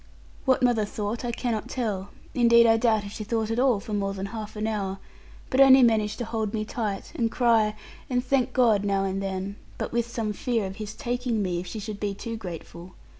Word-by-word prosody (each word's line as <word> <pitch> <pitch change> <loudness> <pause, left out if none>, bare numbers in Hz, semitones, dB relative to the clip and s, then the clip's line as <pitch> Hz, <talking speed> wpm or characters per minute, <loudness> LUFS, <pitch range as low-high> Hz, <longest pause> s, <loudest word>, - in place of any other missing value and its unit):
What 260 -2 +3
mother 240 -3 +3
thought 210 +1 -3
I 240 - -1
cannot 235 -1 -2
tell; 210 -7 -2 0.2
and 250 - -1
indeed 235 0 +7
I 225 -1 +6
doubt 220 -2 +2
if 200 - -7
she 215 - -6
thought 220 0 -1
at 225 - 0
all 250 -5 +3
for 215 - -7
more 195 -1 -1
than 195 0 -4
half 215 -1 -6
an 210 0 -2
hour, 200 -3 -2 0.5
but 260 - +4
only 265 -1 +8
managed 215 -2 +2
to 240 - -3
hold 220 -1 -2
me 215 -1 -1
tight, 210 -3 -3
and 230 -1 +1
cry, 225 -3 +3 0.3
and 250 -1 0
thank 260 -1 +1
God 230 -6 +3
now 195 -1 +1
and 195 0 -1
then, 195 +1 -4 0.2
but - - -3
with 235 0 0
some 225 -3 -2
fear 230 0 -1
of 190 +1 -6
His 215 -1 -6
taking 245 -4 -1
me, 180 -2 -1
if 180 - -7
she 220 - -6
should 210 -1 -6
be 200 -1 -2
too 230 +3 -5
grateful. 180 -2 -8
220 Hz, 225 wpm, -26 LUFS, 200-235 Hz, 0.5 s, only